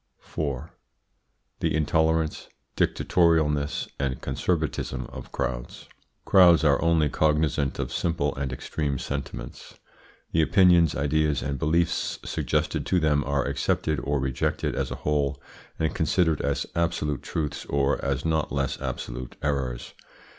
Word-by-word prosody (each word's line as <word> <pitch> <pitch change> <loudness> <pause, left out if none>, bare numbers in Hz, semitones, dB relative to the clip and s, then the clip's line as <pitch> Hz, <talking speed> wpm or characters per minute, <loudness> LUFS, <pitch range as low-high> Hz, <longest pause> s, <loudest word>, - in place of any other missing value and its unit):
4. 70 0 -4 0.9
THE - - 0
INTOLERANCE, 80 +1 +1 0.3
DICTATORIALNESS 80 -4 +2
AND 65 -2 -1
CONSERVATISM 65 -3 -2
OF - - -9
CROWDS. - - -4 0.4
Crowds 90 -4 +6
are 70 -2 +4
only 85 -2 +3
cognisant 75 -2 +1
of - - -3
simple 75 -4 0
and 70 -1 -3
extreme 70 +2 -2
sentiments; 70 +2 -6 0.5
the 80 - +3
opinions, 85 -1 +5
ideas, 75 +1 +1
and 70 -1 -3
beliefs 85 +4 +1
suggested - - -1
to 90 - +3
them 75 -3 +2
are 70 -1 0
accepted 80 -2 0
or 70 0 0
rejected 65 -2 -1
as - - -2
a - - -4
whole, 70 -2 +1 0.4
and 80 0 0
considered 80 -2 +1
as 70 -1 -1
absolute 75 -4 0
truths 75 -3 -3
or 70 0 +1
as 70 0 -1
not 80 -1 0
less 70 -2 -2
absolute - - -5
errors. 70 -4 -2
75 Hz, 125 wpm, -26 LUFS, 70-80 Hz, 0.9 s, Crowds